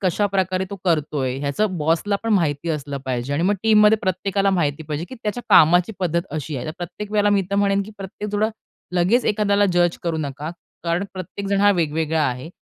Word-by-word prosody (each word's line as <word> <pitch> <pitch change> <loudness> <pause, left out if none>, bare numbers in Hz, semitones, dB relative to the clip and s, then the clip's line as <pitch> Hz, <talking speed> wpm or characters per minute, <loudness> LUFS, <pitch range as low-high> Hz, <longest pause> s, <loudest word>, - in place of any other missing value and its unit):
कशाप्रकारे 190 -1 0
तो 200 - -5
करतोय, 150 -6 0
ह्याचं 180 +8 -1
बॉसला 165 +7 +1
पण 225 -1 0
माहिती 160 -4 0
असलं 145 -2 -3
पाहिजे. 130 +1 -2
आणि 145 +3 0
मग 195 +4 +3
टीममध्ये 215 0 +5
प्रत्येकाला 195 +1 0
माहिती 160 -5 0
पाहिजे, 150 +1 -4
की 260 - -8
त्याच्या 215 +3 -3
कामाची 175 +2 +6
पद्धत 170 -2 0
अशी 150 -1 -4
आहे. 125 - -5
तर 155 - -4
प्रत्येक 190 +4 -6
वेळेला 205 -1 +3
मी 200 -1 +3
तर - - 0
म्हणेन, 200 0 +2
की 205 - -10
प्रत्येक 200 +2 -6
थोडं 210 +1 +2 0.5
लगेच 185 +8 +3
एखाद्याला 205 -1 +2
जज 175 -1 +2
करू 170 -2 -1
नका. 145 +1 -4 0.3
कारण 170 +3 0
प्रत्येकजण 195 +2 -3
हा 205 0 +6
वेगवेगळा 160 0 0
आहे. 125 +4 -5
180 Hz, 190 wpm, -22 LUFS, 155-200 Hz, 0.5 s, कामाची